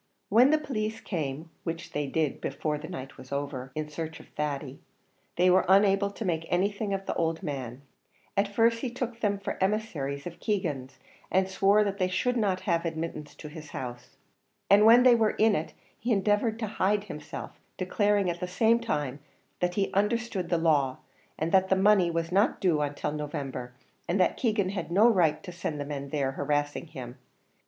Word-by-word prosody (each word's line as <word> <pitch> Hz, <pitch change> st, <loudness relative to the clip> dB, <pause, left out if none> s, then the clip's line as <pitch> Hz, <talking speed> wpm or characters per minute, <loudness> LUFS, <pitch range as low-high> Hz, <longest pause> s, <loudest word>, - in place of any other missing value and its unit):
When 240 Hz, +6 st, +6 dB
the 310 Hz, -, +5 dB
police 225 Hz, -7 st, -3 dB
came, 160 Hz, -5 st, -4 dB
which 165 Hz, +1 st, -5 dB
they 145 Hz, -1 st, -2 dB
did 155 Hz, 0 st, -1 dB
before 150 Hz, +2 st, -2 dB
the 155 Hz, -, -8 dB
night 135 Hz, -7 st, -7 dB
was 130 Hz, -, -12 dB
over, 140 Hz, -2 st, -4 dB
in 155 Hz, 0 st, -2 dB
search 160 Hz, +1 st, -6 dB
of -, -, -15 dB
Thady, 145 Hz, -2 st, -4 dB, 0.6 s
they 180 Hz, +1 st, +3 dB
were 185 Hz, +1 st, +5 dB
unable 195 Hz, +1 st, +5 dB
to 205 Hz, +2 st, -6 dB
make 165 Hz, -2 st, -1 dB
anything 200 Hz, +3 st, 0 dB
of 195 Hz, 0 st, -2 dB
the -, -, -1 dB
old 165 Hz, -1 st, -1 dB
man; 130 Hz, -2 st, -5 dB, 0.5 s
at 200 Hz, 0 st, +2 dB
first 230 Hz, +3 st, +2 dB
he 255 Hz, -, -2 dB
took 245 Hz, -1 st, -4 dB
them 205 Hz, -3 st, +1 dB
for 195 Hz, -, -5 dB
emissaries 165 Hz, -10 st, -1 dB
of 175 Hz, -1 st, -7 dB
Keegan's, 150 Hz, -, -2 dB, 0.3 s
and 190 Hz, 0 st, +2 dB
swore 200 Hz, +2 st, +4 dB
that 200 Hz, -1 st, -3 dB
they 185 Hz, -, +2 dB
should 220 Hz, +7 st, 0 dB
not 200 Hz, -5 st, +1 dB
have 170 Hz, -4 st, 0 dB
admittance 160 Hz, -3 st, -4 dB
into -, -, -10 dB
the 160 Hz, +1 st, -8 dB
house, 125 Hz, -5 st, -8 dB, 0.5 s
and 205 Hz, +2 st, +7 dB
when 240 Hz, +2 st, +8 dB
they 255 Hz, -1 st, +7 dB
were 225 Hz, -2 st, +2 dB
in 220 Hz, 0 st, +4 dB
it 155 Hz, -, -4 dB, 0.2 s
he 240 Hz, -, -2 dB
endeavoured 210 Hz, +2 st, +2 dB
to 230 Hz, -, -2 dB
hide 205 Hz, 0 st, +1 dB
himself, 150 Hz, -7 st, -7 dB, 0.3 s
declaring 205 Hz, +1 st, +1 dB
at 175 Hz, 0 st, -2 dB
the 180 Hz, -, -3 dB
same 225 Hz, +5 st, +3 dB
time, 150 Hz, -, -2 dB, 0.4 s
that 180 Hz, 0 st, 0 dB
he 195 Hz, -1 st, 0 dB
understood 210 Hz, -2 st, 0 dB
the 170 Hz, -, +2 dB
law; 145 Hz, -6 st, +2 dB, 0.4 s
that 190 Hz, +4 st, +2 dB
the 190 Hz, -, +4 dB
money 190 Hz, -2 st, +4 dB
was 165 Hz, 0 st, -2 dB
not 200 Hz, +6 st, +2 dB
due 165 Hz, -6 st, +2 dB
till 150 Hz, -, -2 dB
November, 140 Hz, -4 st, -5 dB, 0.4 s
and 180 Hz, +3 st, 0 dB
that 180 Hz, -, +3 dB
Keegan 215 Hz, -6 st, +1 dB
had 190 Hz, -4 st, -4 dB
no 205 Hz, +6 st, +6 dB
right 165 Hz, -8 st, +3 dB
to 180 Hz, -, -7 dB
send 165 Hz, -3 st, -4 dB
the 145 Hz, -, -3 dB
men 140 Hz, -1 st, -5 dB
there, 135 Hz, -2 st, 0 dB
harassing 145 Hz, +3 st, -1 dB
him, 130 Hz, -5 st, -7 dB
yet. 120 Hz, -, -14 dB
180 Hz, 195 wpm, -28 LUFS, 150-205 Hz, 0.6 s, when